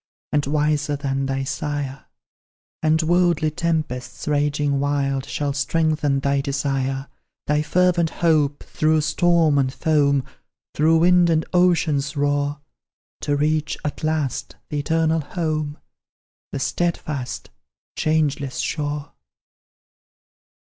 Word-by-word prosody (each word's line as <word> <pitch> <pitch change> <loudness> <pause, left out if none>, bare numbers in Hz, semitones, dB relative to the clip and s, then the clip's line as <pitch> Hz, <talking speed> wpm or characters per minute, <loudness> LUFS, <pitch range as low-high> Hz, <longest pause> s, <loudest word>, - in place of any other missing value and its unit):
And 145 -2 +1
wiser 150 0 +1
than 135 -1 -2
thy 135 0 -1
sire; 145 -1 -4 0.8
And 160 +1 +2
worldly 170 -2 +2
tempests, 155 -7 -3
raging 145 -1 +1
wild, 140 -1 0
Shall 145 -1 -2
strengthen 145 -1 +1
thy 140 0 +1
desire 135 -1 -2 0.4
Thy 150 0 +2
fervent 175 +1 +2
hope, 150 -4 +1
through 155 0 +1
storm 160 -1 +3
and 130 -1 +1
foam, 140 -2 +2 0.5
Through 160 +2 +4
wind 175 +1 +5
and 160 -1 +2
ocean's 160 -6 +2
roar, 145 0 0 0.6
To 145 - 0
reach, 155 +1 0
at 150 - -4
last, 155 -4 -1
the 150 - -2
eternal 160 +2 +1
home, 155 -1 -3 0.7
The - - -3
steadfast, 150 -4 -2 0.4
changeless 150 -4 0
shore!" 145 -1 -3
150 Hz, 105 wpm, -22 LUFS, 140-160 Hz, 0.8 s, wind